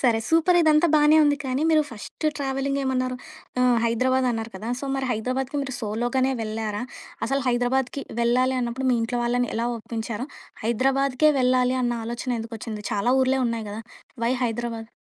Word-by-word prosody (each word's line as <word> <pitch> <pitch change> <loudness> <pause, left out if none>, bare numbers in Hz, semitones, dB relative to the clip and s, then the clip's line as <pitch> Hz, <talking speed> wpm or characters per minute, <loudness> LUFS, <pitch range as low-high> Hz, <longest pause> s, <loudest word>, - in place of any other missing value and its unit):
సరే 235 -4 +3
సూపర్! 330 +2 +4
ఇదంతా 310 +1 +5
బాగానే 300 0 +6
ఉంది 290 0 +3
కానీ, 260 +2 -1
మీరు 310 -1 +5
ఫస్ట్ 230 +7 -9
ట్రావెలింగ్ 275 0 -1
ఏమన్నారు 255 -1 -1 0.4
ఆహ్, 250 -2 +4
హైదరాబాద్ 255 +3 +2
అన్నారు 225 -1 -3
కదా! 215 +4 -6
సో - - -5
మరి 265 -1 -2
హైదరాబాద్‌కి 255 +5 -2
మీరు 260 -2 -5
సోలోగానే 240 +4 0
వెళ్లారా? 215 -1 -3 0.4
అసలు 275 0 0
హైదరాబాద్‌కి 250 +2 0 0.2
వెళ్ళాలి 255 +2 +2
అన్నప్పుడు 245 +2 -2
మీ 245 - +3
ఇంట్లో 240 +2 -2
వాళ్ళని 245 0 0
ఎలా 235 +1 0
ఒప్పించారు? 230 +2 -5 0.4
హైదరాబాద్‌కే 270 +5 +2
వెళ్ళాలి 255 0 +3
అన్న 240 -1 +1
ఆలోచన 240 +1 -3
ఎందుకొచ్చింది 225 -1 -6
చాలా 210 +4 +1
ఊర్లే 265 +1 +2 0.2
ఉన్నాయి 220 -2 -5
గదా! 215 +2 -6 0.4
వై 240 - +2
హైదరాబాద్? 230 -1 -3
250 Hz, 160 wpm, -24 LUFS, 230-265 Hz, 0.4 s, బాగానే